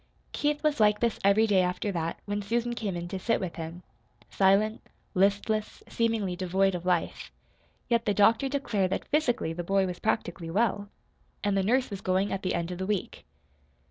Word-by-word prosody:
Keith 295 0 -1
was 305 -3 +1
like 210 -1 +4
this 235 -2 0
every 200 +3 +5
day 200 -4 +3
after 180 +3 -1
that, 165 -2 -3
when 205 0 -2
Susan 235 +4 -1
came 210 -6 -3
in 175 0 -4
to 190 +2 -5
sit 230 +4 +1
with 180 -2 -5
him 165 +2 -7 0.5
silent, 200 +3 +3 0.3
listless, 205 +2 0
seemingly 225 -5 0
devoid 190 +1 +1
of 180 0 -5
life. 175 -2 -1 0.6
Yet 235 -1 +1
the 205 - +2
doctor 225 +6 +4
declared 235 -9 0
that 195 - -3
physically 255 - +1
the 175 +1 -4
boy 195 +2 +2
was 180 -1 -5
practically 175 -6 -2
well. 205 +1 0 0.5
And 205 -1 +1
the 195 - +2
nurse 245 +5 +1
was 200 -1 -5
going 190 +1 +1
at 195 - -3
the 185 - -1
end 170 +1 -2
of 180 - -6
the 190 - -3
week. 205 - -3
200 Hz, 190 wpm, -28 LUFS, 185-225 Hz, 0.6 s, every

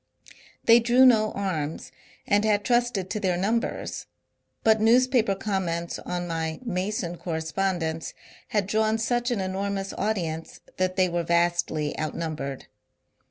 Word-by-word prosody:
They 230 +1 +8
drew 245 +3 +5
no 215 -4 +5
arms, 165 -6 -3 0.3
and 205 +1 +2
had 205 -2 +2
trusted 240 -6 +1
to 215 - -1
their 185 -4 0
numbers; 220 +6 -2 0.6
but 220 -1 +4
newspaper 235 -2 +4
comments 180 -4 -2
on 175 0 -4
my 160 -1 -3
Mason. 185 -3 -2
correspondence 165 0 -2 0.3
had 205 -3 0
drawn 220 +2 +1
such 240 +2 0
an 240 -4 -1
enormous 195 +1 -2
audience 170 -6 -3 0.2
that 185 0 0
they 185 -1 +3
were 175 -1 -1
vastly 170 -3 +1
outnumbered. 155 -3 -4
190 Hz, 125 wpm, -26 LUFS, 170-220 Hz, 0.6 s, They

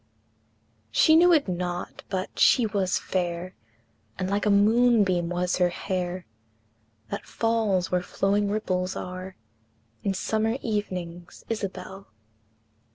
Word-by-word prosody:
She 315 - +5
knew 350 +2 +6
it 310 -8 +4
not, 175 -1 -4
but 185 -1 -4
she 245 - +5
was 195 -4 0
fair, 175 0 -3 0.6
And 185 0 -2
like 205 +1 0
a - - +4
moonbeam 205 -4 +4
was 180 0 0
her 180 -1 +3
hair, 180 0 -3 0.9
That - - -5
falls 220 -5 0
where 180 0 +2
flowing 200 +3 0
ripples 185 -3 -1
are 185 +1 -6 0.7
In 195 -1 -1
summer 220 +4 0
evenings, 180 -6 -4
Isabel! 195 -2 -5
190 Hz, 115 wpm, -26 LUFS, 180-215 Hz, 0.9 s, knew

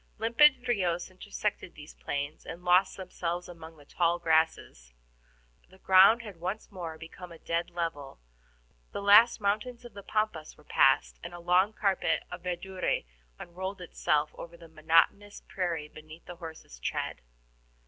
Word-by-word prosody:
Limpid 255 +3 +4
RIOS 180 -7 -1
intersected 200 0 -5
these 150 +1 -12
plains, 145 +2 -5
and 170 +2 -9
lost 180 +2 +4
themselves 180 -2 -4
among 165 -2 -12
the 145 - -17
tall 170 +2 +1
grasses. 160 - 0 0.7
The 190 - -18
ground 195 +5 +6
had 205 -6 -10
once 190 +7 -5
more 170 -4 -7
become 170 +2 -11
a 165 - -11
dead 170 +1 -2
level, 165 -5 -5 0.8
the - - -4
last 215 +4 +7
mountains 215 +4 -2
of 240 - -11
the 200 - -9
Pampas 215 -7 -3
were 150 - -19
passed, 135 -1 +2
and 175 +1 -7
a - - -9
long 180 +4 +3
carpet 200 -3 0
of - - -7
verdure 185 +1 -2 0.3
unrolled 190 +3 -6
itself 150 -3 0
over 170 0 -10
the 165 -1 -14
monotonous 165 +6 +1
prairie 170 -6 -3
beneath 155 +2 -14
the 175 - -10
horses' 160 - -10
tread. - - -3
175 Hz, 150 wpm, -29 LUFS, 160-200 Hz, 0.8 s, last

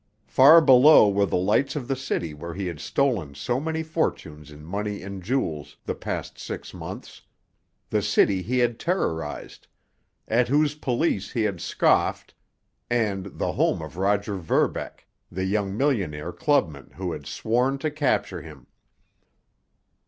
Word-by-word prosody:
Far 150 +6 +7
below 135 -3 +7
were 100 0 +2
the - - 0
lights 105 +11 +1
of 135 -5 -4
the 135 - 0
city 110 -11 -3
where 85 +3 -8
he 100 0 -3
had 85 -4 -5
stolen 100 - -1
so 120 - -1
many 160 +2 -2
fortunes 80 - -3
in 75 0 -13
money 100 +3 -4
and 100 -1 -7
jewels 90 - -3
the - - -2
past - - -5
six - - -7
months, - - -9 0.7
the 105 - +2
city 100 -2 +2
he 125 +7 -2
had 120 -2 +1
terrorized, 80 - -3 0.6
at 120 +2 +2
whose 145 +3 +2
police 130 - -1
he 115 - 0
had 100 -5 -2
scoffed, - - +1 0.6
and 100 -5 -1
the - - -1
home - - +1
of 80 - -9
Roger 100 +1 0
Verbeck, 85 -4 -1 0.3
the 95 +2 -3
young 100 0 -1
millionaire 95 - -1
clubman 85 - 0
who - - -4
had - - -7
sworn 125 +5 0
to 150 +3 -2
capture 145 -3 -1
him. - - -13
105 Hz, 150 wpm, -25 LUFS, 90-135 Hz, 0.7 s, Far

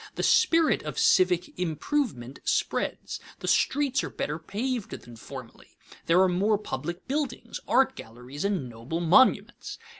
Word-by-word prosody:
The - - -3
spirit 330 -1 +4
of - - -6
civic 180 -1 +2
improvement 160 - -2
spreads. 420 +1 -1 0.2
The - - -7
streets 280 -1 +2
are - - -4
better 150 +2 -4
paved 225 +6 -4
than 120 0 -13
formerly; 125 +1 -11 0.3
there 170 +2 +5
are - - +4
more 200 +4 +2
public 175 -3 -6
buildings, 265 -4 -3
art 265 +2 +3
galleries, 125 +5 -8
and 195 -10 -1
noble 120 +8 -5
monuments. 180 +10 +3
180 Hz, 140 wpm, -27 LUFS, -, 0.3 s, there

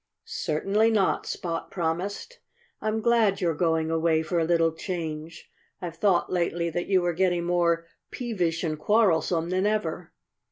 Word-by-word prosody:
"Certainly 200 +8 +1
not!" 210 -4 +1
Spot 165 -2 -4
promised. 185 - -3 0.4
"I'm 215 +1 -1
glad 225 -3 +3
you're 170 -3 +1
going 160 0 0
away 160 0 +2
for 170 +2 -1
a - - +2
little 165 0 +3
change. 160 -2 -6 0.3
I've 170 -2 -6
thought 185 -1 +2
lately 170 -1 0
that 175 +2 -3
you 190 -2 +3
were 175 0 +1
getting 175 0 +1
more 170 -1 +1 0.2
peevish 180 -10 -2
and 155 -2 -2
quarrelsome 175 -4 +2
than 185 +2 +1
ever." 215 0 -2
175 Hz, 150 wpm, -26 LUFS, 165-195 Hz, 0.4 s, glad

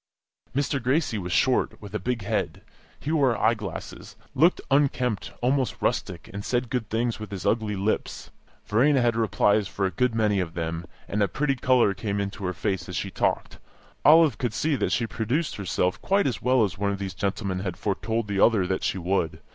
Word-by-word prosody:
Mr. 140 0 0
Gracie 130 -2 +1
was 90 -1 -5
short, 130 +7 +2
with 100 -1 -11
a 105 - -1
big 120 +2 -2
head; 100 - -2 0.4
he 150 - -3
wore 140 -7 +3
eye 110 +2 +3
glasses, 105 -6 -7 0.2
looked 165 +7 +4
unkempt, 130 -6 +1
almost 130 +1 0
rustic, - - -2
and 100 0 -5
said 120 0 -1
good 120 -5 -2
things 115 +1 -1
with 105 -2 -7
his 95 -2 -6
ugly 110 -2 +1
lips. 100 +3 -2 0.3
Verena 130 +6 +3
had 120 -2 +2
replies 105 -2 +2
for 100 - -2
a 95 - 0
good 125 +6 0
many 105 -3 +2
of 85 -2 -3
them, 85 +1 -3 0.2
and 105 - -1
a 100 - +4
pretty 140 +4 0
colour 125 -5 +3
came 100 -1 -3
into 100 0 -4
her 90 - -1
face 95 +2 -2
as - - -5
she - - -3
talked. - - -1 0.4
Olive 155 -4 +6
could 120 -4 -2
see 150 +7 +1
that - - -1
she 115 - +1
produced 120 +8 -2
herself 90 -2 -1
quite 200 +1 +2
as 125 - -1
well 125 -2 +3
as 95 -2 -2
one 100 0 +1
of 100 - -2
these 95 -1 -5
gentlemen 100 -2 -2
had 95 -2 -4
foretold 110 +2 -2
the 100 -1 -2
other 105 -3 +4
that 95 +1 -2
she - - 0
would. 85 -3 -1
110 Hz, 205 wpm, -26 LUFS, 100-125 Hz, 0.4 s, Olive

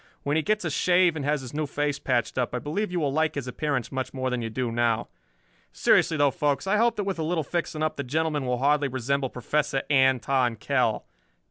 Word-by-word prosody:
When 145 +1 0
he 160 - +3
gets 210 +2 0
a 160 - -1
shave 180 +2 +3
and 150 - -4
has 150 -1 +1
his 125 0 -9
new 150 0 -2
face 145 0 -1
patched 125 0 -1
up 125 0 -1
I - - 0
believe 165 - -3
you 180 - -1
will 145 -4 0
like 160 +1 +1
his 140 -3 -3
appearance 130 0 -2
much 130 0 -4
more 130 -1 -1
than 125 -1 -1
you 115 - -3
do 120 +1 -2
now. 115 -1 0 0.6
"Seriously 160 - +3
though, 145 -1 +4
folks, 145 +3 0
I 195 +2 +2
hope 235 +2 +3
that 205 - -2
with 195 -3 -3
a - - 0
little 160 0 0
fixing 155 0 -3
up 155 - -1
the 140 - -2
gentleman 150 0 -1
will 125 0 0
hardly 145 +2 +2
resemble 130 +1 -1
Professor 135 +2 -1
Anton 130 -2 +3
Kell. 120 -1 0
140 Hz, 230 wpm, -26 LUFS, 130-155 Hz, 0.6 s, though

